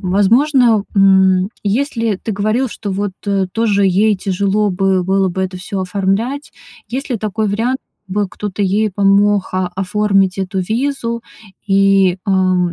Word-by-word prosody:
возможно, 225 +4 +3
м, 190 -1 +4
если 230 0 -1
ты 220 - -4
говорил, 215 +6 0
что 210 -1 -6
вот 195 0 -2 0.4
тоже 205 -3 +1
ей 205 +3 +2
тяжело 200 +2 0
бы 190 0 +1
было 190 +1 +1
бы 190 +1 -3
это 185 0 -4
всё 190 +1 -5
оформлять. 200 +9 -2 0.4
Есть 265 +4 -4
ли 245 - -1
такой 215 0 -2
вариант- 235 +6 -1 0.3
бы 205 +1 -1
кто-то 205 +1 -5
ей 205 +3 +1
помог 200 +1 +2
оформить 190 +1 0
эту 190 0 -2
визу 235 +2 -2 0.4
и, 195 -2 +3
ам, 185 -3 +1
200 Hz, 135 wpm, -16 LUFS, 190-220 Hz, 0.4 s, м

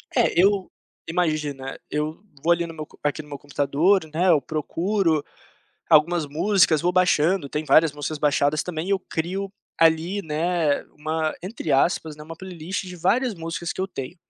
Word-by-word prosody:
É - - +3
eu, 195 0 +3 0.4
imagina, 155 -6 -2
eu 150 +4 -3 0.2
vou 170 - +3
ali 170 0 -1
no 165 - -8
meu 155 -1 -6
co - - -21
aqui 145 +1 -1
no 150 - -17
meu 145 - -6
computador, 145 +6 +2
né, 180 +4 +2
eu 155 -5 +5
procuro 165 +3 0 0.7
algumas 160 +1 +4
músicas, 160 +1 +3
vou 175 - +2
baixando, 180 -3 +2
tem 150 +2 -3
várias 160 0 +5
músicas 150 +1 -4
baixadas 145 0 +2
também 175 +1 -4
eu 195 -1 +2
crio 185 +3 -4 0.3
ali, 165 +5 +3
né, 160 -2 0
uma, 155 +1 -1
entre 185 -4 -4
aspas, 155 +2 +2
né, 150 - -10
uma 165 +2 -9
playlist 180 +1 -5
de 180 -1 -8
várias 230 +8 +1
músicas 165 -1 -4
que - - -4
eu 190 - -1
tenho, 135 -3 -7
165 Hz, 170 wpm, -24 LUFS, 150-180 Hz, 0.7 s, eu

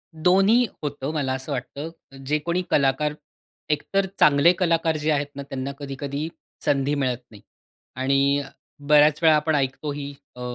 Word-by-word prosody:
दोन्ही 195 +9 +4 0.2
होतं 145 0 -3
मला 140 -4 -1
असं 130 +3 -5
वाटतं. 140 +4 -4 0.2
अ, - - -14
जे 150 +3 +1
कोणी 170 +4 -1
कलाकार 145 +2 +2 0.6
एकतर 195 +6 0
चांगले 150 +3 +6
कलाकार 165 -2 +2
जे 155 +1 0
आहेत 145 -1 0
ना, 140 - -5
त्यांना 135 0 -5
कधी-कधी 140 +2 -4 0.4
संधी 140 +1 +1
मिळत 130 -4 0
नाही 105 - -14 0.5
आणि 140 +2 +2 0.5
बऱ्याच 150 0 +5
वेळा 160 -1 +7
आपण 150 +1 +1
ऐकतो 140 +2 -1
ही 145 0 -6 0.2
अ, 125 - -10
145 Hz, 155 wpm, -24 LUFS, 135-155 Hz, 0.6 s, वेळा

